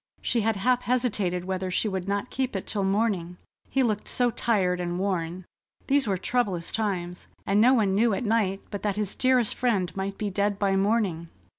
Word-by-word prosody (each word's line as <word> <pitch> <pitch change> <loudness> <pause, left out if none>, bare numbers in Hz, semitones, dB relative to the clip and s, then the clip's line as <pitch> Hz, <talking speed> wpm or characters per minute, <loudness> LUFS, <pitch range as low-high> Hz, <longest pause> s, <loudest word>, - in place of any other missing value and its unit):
She 235 - 0
had 220 +1 +1
half 250 +5 +2
hesitated 210 -9 0
whether 185 0 -2
she 185 - 0
would 190 -2 -3
not 200 +4 -2
keep 260 -3 -2
it 195 - -3
till 205 -2 -1
morning, 195 -3 0 0.3
he 270 - +2
looked 215 -3 -1
so 245 -1 +2
tired 190 -6 +1
and 175 0 -2
worn. 180 -2 -2 0.4
These 275 -2 +2
were 195 -2 +1
troublous 190 -4 -1
times, 180 -5 -3 0.2
and 200 +2 +3
no 255 +3 +6
one 205 -5 +2
knew 225 +4 +3
at 245 - -3
night 205 -3 +1
but 205 - -4
that 205 -2 -1
his 210 -2 -2
dearest 255 -3 +2
friend 205 -8 0
might 195 0 -3
be 210 -2 -2
dead 200 +1 0
by 195 -1 +1
morning. 195 -5 0
200 Hz, 195 wpm, -26 LUFS, 185-230 Hz, 0.4 s, no